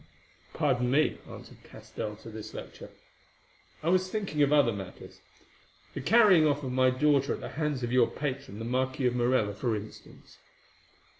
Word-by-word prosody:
"Pardon 125 -4 +1
me," 145 +4 +2
answered - - -12
Castell 105 -1 -7
to 115 +2 -12
this 110 -1 -9
lecture. - - -9 0.9
"I 165 - 0
was 185 +1 +2
thinking 195 -8 -2
of 140 0 +3
other 145 -5 +4
matters. 95 -2 -9 0.7
The 140 - -5
carrying 195 - +5
off 145 0 0
of 130 - -3
my 130 0 +3
daughter 140 +1 +2
at - - -10
the - - -7
hands 150 -4 -2
of 120 - -2
your 125 -2 +5
patron, 135 -5 -5
the 115 - -6
Marquis 130 +2 -1
of 125 0 +1
Morella, 120 -4 +1
for 110 +3 -1
instance." 105 +1 -11
130 Hz, 165 wpm, -29 LUFS, 120-150 Hz, 0.9 s, carrying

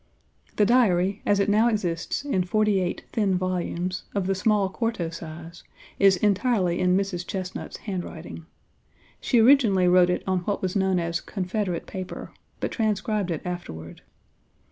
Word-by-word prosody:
The 210 - +4
Diary, 200 -5 +3
as 205 -1 +3
it 200 - +2
now 215 +3 +4
exists 180 - -2
in 190 -11 +1
forty 210 +1 +2
eight 180 -1 -2
thin 200 -4 +1
volumes, 185 0 -2
of 200 -2 0
the 195 - +1
small 200 +1 +2
quarto 190 -4 -2
size, 165 0 -9 0.4
is 195 -1 +5
entirely 200 -2 +1
in 180 0 +3
Mrs. 195 -3 -2
Chesnut's 185 -1 -5
handwriting. 175 -4 -6 0.7
She 245 - +2
originally 220 -8 +5
wrote 180 0 +5
it 180 - -1
on 185 -1 +1
what 200 +3 -2
was 185 +1 -1
known 190 -2 +2
as 170 0 -1
"Confederate 185 -2 -3
paper," 185 -1 -7 0.3
but - - -2
transcribed 215 -3 -1
it 165 -3 -3
afterward. 85 - -7
185 Hz, 150 wpm, -25 LUFS, 180-210 Hz, 0.7 s, is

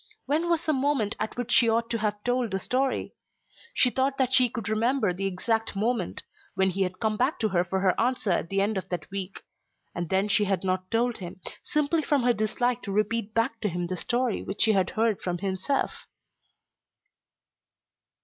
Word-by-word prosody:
When 320 +4 0
was 335 -1 +1
the 310 - +2
moment 265 -6 +1
at 215 +2 -3
which 245 -1 -3
she 235 -2 +5
ought 230 +1 0
to 230 - 0
have 210 -1 -2
told 245 -1 0
the 195 - -2
story? 260 +6 -1 0.6
She 250 - +4
thought 270 +2 0
that 260 -1 +1
she 250 -1 +6
could 225 -4 -5
remember 220 -1 +1
the 195 +2 -2
exact 225 +4 -1
moment; 220 -1 -1 0.3
when 190 0 +3
he 195 +2 -3
had 185 0 -1
come 215 -1 0
back 260 +6 +1
to 220 - 0
her 175 -2 +2
for 190 +1 -2
her 190 -2 +3
answer 245 -4 0
at 170 -1 0
the 195 0 +1
end 205 0 +1
of - - -11
that 175 -2 -5
week. 195 -1 -5 0.5
And 175 -2 -4
then 190 +2 +2
she 210 0 +3
had 195 -2 0
not 185 0 -1
told 235 +1 +1
him, 180 -1 -8 0.2
simply 300 +2 +1
from 285 -3 +1
her 245 0 +4
dislike 240 +3 0
to 200 - -5
repeat 215 +1 -1
back 230 0 0
to 210 - 0
him 175 0 -2
the 185 +1 -3
story 240 +5 0
which 195 - -1
she 220 - +5
had 190 -2 +2
heard 225 -3 0
from 175 -1 -2
himself! 190 +8 -2
220 Hz, 205 wpm, -27 LUFS, 190-245 Hz, 0.6 s, she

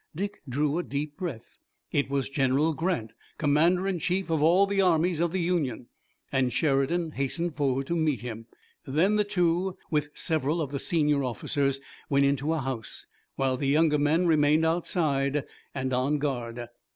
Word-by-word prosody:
Dick 200 +5 -4
drew 145 +5 0
a - - -1
deep 145 0 -4
breath. 165 - -7 0.3
It 140 - 0
was 140 -1 -1
General 140 +3 +1
Grant, 155 -8 -2 0.3
Commander 165 +5 +2
in 190 -3 -1
Chief 180 +2 -1
of 160 -2 +1
all 175 +6 +5
the 200 0 +1
armies 175 -2 +2
of 170 -1 +1
the 190 - -1
Union, 160 -10 -1 0.4
and 130 -2 +1
Sheridan 155 +4 +1
hastened 155 +4 -2
forward 135 -2 0
to 170 - -2
meet 155 -5 0
him. 115 -2 -7 0.4
Then 175 +10 +2
the 210 - +3
two, 180 -1 0
with 150 -1 0
several 155 0 0
of 145 -4 -2
the 140 - -3
senior 150 -3 +1
officers, 135 +3 -1 0.3
went 140 0 +3
into 140 +2 +1
a 160 -2 0
house, 130 -4 -5 0.3
while 135 -1 0
the 140 - -2
younger 150 +1 +3
men 155 +5 +2
remained 155 -1 +4
outside, 150 -4 0 0.3
and 130 -1 -2
on 130 +4 +1
guard. 120 -4 -3
150 Hz, 170 wpm, -27 LUFS, 135-170 Hz, 0.4 s, all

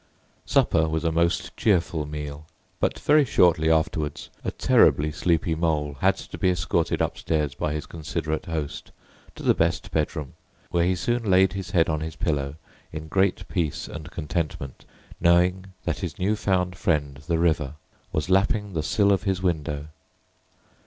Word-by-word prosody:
Supper 80 -1 +3
was 80 +1 -1
a 80 - +1
most 85 +1 0
cheerful 85 -7 +1
meal; 75 0 -6 0.3
but - - 0
very 150 0 +4
shortly 85 - +3
afterwards 80 -1 0
a - - -1
terribly 75 +1 +3
sleepy 80 +1 +1
Mole 75 -3 -1
had - - +3
to - - -9
be 95 - +3
escorted 90 -2 0
upstairs 75 -4 -1
by 75 - -2
his 75 - -4
considerate 80 +1 -4
host, 80 -3 -4 0.4
to - - -9
the - - +5
best - - 0
bedroom, 75 -2 -2 0.4
where 85 -1 +2
he 90 +1 +2
soon 120 +3 -1
laid 95 +1 +5
his 95 +1 -5
head 85 -5 +3
on 80 -1 0
his 80 +1 -5
pillow 70 -4 -1 0.4
in 80 0 -7
great 95 +2 +1
peace 80 -5 -2
and 75 -1 -8
contentment, 75 -5 -4 0.3
knowing 90 +2 +3 0.2
that 85 -3 -2
his 90 -5 -5
new 100 +4 +1
found 90 -3 0
friend 75 -6 0
the 85 - +1
River 80 -4 +1 0.4
was 75 - -1
lapping 100 +2 +2
the 80 - 0
sill 100 +6 +2
of 100 - +2
his 95 -2 -1
window. 75 -4 -1
80 Hz, 160 wpm, -25 LUFS, 75-90 Hz, 0.4 s, the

